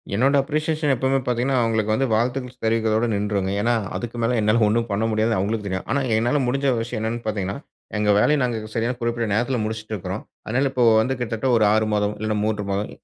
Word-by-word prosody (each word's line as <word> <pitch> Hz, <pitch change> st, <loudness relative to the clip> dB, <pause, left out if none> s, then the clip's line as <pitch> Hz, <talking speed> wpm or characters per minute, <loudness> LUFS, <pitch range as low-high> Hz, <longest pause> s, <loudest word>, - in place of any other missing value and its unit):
என்னோட 135 Hz, +6 st, +3 dB
அப்ரிசியேஷன் 155 Hz, -1 st, 0 dB
எப்பவுமே 130 Hz, +2 st, +1 dB
பார்த்தீங்கன்னா, 125 Hz, +2 st, 0 dB
அவுங்ககளுக்கு 110 Hz, -2 st, +1 dB
வந்து 135 Hz, +3 st, +1 dB
வாழ்த்துக்கள் 125 Hz, +2 st, -1 dB
தெரிவிக்கிறதோட 110 Hz, 0 st, +1 dB
நின்றுருவேங்க. 100 Hz, -2 st, -1 dB
ஏன்னா, 120 Hz, +2 st, +2 dB, 0.2 s
அதுக்கு 120 Hz, 0 st, -5 dB
மேல 120 Hz, +1 st, +1 dB
என்னால 110 Hz, +2 st, +2 dB
ஒன்னும் 115 Hz, +2 st, 0 dB
பண்ண 100 Hz, +2 st, 0 dB
முடியாது 110 Hz, +1 st, +1 dB
அவங்ககளுக்கு 105 Hz, +2 st, -1 dB
தெரியும். 95 Hz, 0 st, -3 dB
ஆனா, 140 Hz, -, +2 dB, 0.2 s
என்னால 120 Hz, +6 st, +1 dB
முடிஞ்ச 135 Hz, +1 st, +1 dB
விஷயம் 115 Hz, -1 st, -4 dB
என்னன்னு 115 Hz, +2 st, -3 dB
பார்த்தீங்கன்னா, 100 Hz, -3 st, -2 dB, 0.4 s
எங்க 105 Hz, -, +1 dB
வேலைய 150 Hz, +7 st, +3 dB
நாங்க 110 Hz, -3 st, -2 dB
சரியான 120 Hz, +2 st, -1 dB
குறிப்பிட்ட 120 Hz, -1 st, -1 dB
நேரத்தில 120 Hz, +4 st, +1 dB
முடிச்சுட்டு 110 Hz, 0 st, -5 dB
இருக்குறோம். 95 Hz, +1 st, -5 dB, 0.2 s
அதனால 130 Hz, +5 st, +1 dB
இப்போ 130 Hz, -2 st, +1 dB, 0.2 s
வந்து 125 Hz, +4 st, 0 dB
கிட்டத்தட்ட 115 Hz, +1 st, -2 dB
ஒரு 110 Hz, -, +3 dB
6 110 Hz, 0 st, +2 dB
மாதம், 105 Hz, 0 st, 0 dB
இல்ல 110 Hz, 0 st, -1 dB
3 105 Hz, -1 st, -1 dB
மாதம் 100 Hz, +2 st, -2 dB
115 Hz, 195 wpm, -22 LUFS, 110-125 Hz, 0.4 s, என்னோட